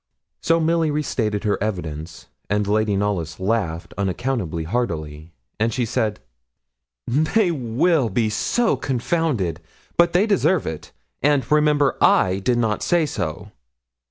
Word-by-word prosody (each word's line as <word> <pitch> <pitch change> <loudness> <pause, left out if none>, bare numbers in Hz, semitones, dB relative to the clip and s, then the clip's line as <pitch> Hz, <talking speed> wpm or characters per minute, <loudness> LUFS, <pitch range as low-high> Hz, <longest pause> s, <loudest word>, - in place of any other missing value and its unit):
So 165 0 +2
Milly 165 0 +2
restated 115 -9 -1
her 105 -3 0
evidence, 85 -7 -4 0.2
and 105 +1 +1
Lady 105 0 +1
Knollys 95 -6 -2
laughed 95 -5 -2
unaccountably 95 -4 -2
heartily; 80 -6 -3 0.3
and 110 +2 +1
she 120 +2 -1
said 110 -2 -1 0.9
'They 165 - +2
will 135 +1 +1
be 110 +3 +1
so 220 - +1
confounded! 125 - -1 0.4
but 170 0 +4
they 185 +4 +4
deserve 190 -5 +2
it; 80 -1 -6 0.3
and, 145 -3 +2
remember, 150 -3 +3
I 95 +1 +4
did 120 +5 +1
not 110 -3 0
say 175 -3 +2
so.' 95 - -4
115 Hz, 130 wpm, -22 LUFS, 95-150 Hz, 0.9 s, but